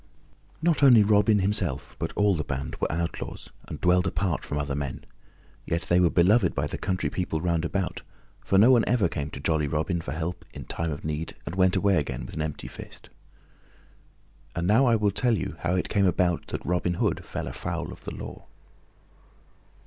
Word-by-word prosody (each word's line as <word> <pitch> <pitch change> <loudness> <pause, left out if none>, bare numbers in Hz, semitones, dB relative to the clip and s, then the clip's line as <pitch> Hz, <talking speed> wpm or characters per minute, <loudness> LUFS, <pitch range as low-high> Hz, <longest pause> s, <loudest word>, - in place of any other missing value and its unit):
Not 170 -3 +2
only 125 -6 +8
Robin 105 +1 +4
himself 95 -7 -1
but - - -2
all 105 -1 +3
the 80 -3 -1
band 70 -1 -4
were - - -1
outlaws 85 +1 -4 0.2
and - - -7
dwelled 90 +1 +3
apart 95 -4 -1
from 75 - -4
other 70 -1 -2
men, 70 -2 -4 0.6
yet 85 +1 -1
they 85 - +2
were 90 -2 +4
beloved 95 +3 +3
by - - 0
the - - -5
country 95 -1 -1
people 90 -4 -2
round 85 -1 0
about, 95 +2 -2 0.4
for 95 - +2
no 110 +6 +7
one 120 -3 +5
ever 120 -7 +3
came 75 -2 -4
to 70 - -8
jolly 75 +1 0
Robin 80 +4 -1
for 65 - -6
help 85 +2 -4
in - - -7
time 85 -1 -3
of 75 - -6
need 75 +1 -3
and 80 - -5
went 95 0 +3
away 100 0 +3
again 70 -5 -2
with - - -10
an 80 - -3
empty 75 -2 -4
fist. - - -11 1.4
And 85 - -1
now 110 +8 +4
I 115 - +5
will 105 -2 +2
tell 120 +2 +2 0.2
how 85 +2 0
it 90 - 0
came 100 -1 +2
about 90 -1 +1
that - - -5
Robin 90 0 0
Hood - - 0
fell - - -5
afoul - - -4
of - - -12
the - - -6
law. - - -9
90 Hz, 195 wpm, -26 LUFS, 80-100 Hz, 1.4 s, only